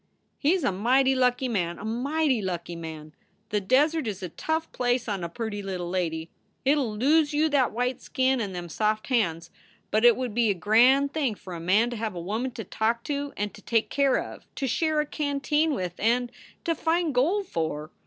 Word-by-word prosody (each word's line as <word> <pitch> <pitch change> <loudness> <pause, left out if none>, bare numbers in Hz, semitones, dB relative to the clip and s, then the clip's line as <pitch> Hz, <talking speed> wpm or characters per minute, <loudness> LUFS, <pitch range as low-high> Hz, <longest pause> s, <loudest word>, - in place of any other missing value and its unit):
"He 315 +5 +3
s 365 - -2
a 205 - +2
mighty 255 +7 +3
lucky 255 0 +2
man, 175 -7 -1
a 210 - -8
mighty 265 +3 0
lucky 175 -2 -4
man! 160 -2 -8 0.4
The 210 -1 0
desert 290 +7 +2
is 195 -2 -4
a 180 - -4
tough 320 - -2
place 245 -1 0
on 200 -4 -2
a 170 - -3
pirty 220 +1 -4
little 185 -3 -4
lady. 165 -3 -2 0.3
It 275 - +5
11 225 -6 -2
lose 295 +5 +3
you 310 +2 +3
that 275 -4 +2
white 245 +2 -2
skin 260 -1 +1
and 195 -4 -4
them 175 -1 -5
soft 215 +6 -1
hands. 170 -9 0 0.4
But 215 +1 +2
it 240 -1 +7
would 250 -4 -3
be 235 -1 +2
a 200 - +2
grand 250 +9 +4
thing 275 -8 0
for 185 -2 -10
a 170 - -5
man 205 +8 +2
to 240 - -4
have 215 -3 -3
a - - -4
woman 215 +9 -2
to 225 - -6
talk 225 +4 -1
to 285 -1 -3
and 205 0 -2
to - - -13
take 230 -2 0
care 275 -2 +3
of - - -6
to 275 - -2
share 310 +4 +1
a - - -3
canteen 295 +1 0
with 180 -6 -3
and 240 +2 +1 0.3
to 335 - +1
find 325 0 0
gold 345 +12 +2
for. 160 - -3
235 Hz, 215 wpm, -26 LUFS, 195-275 Hz, 0.4 s, it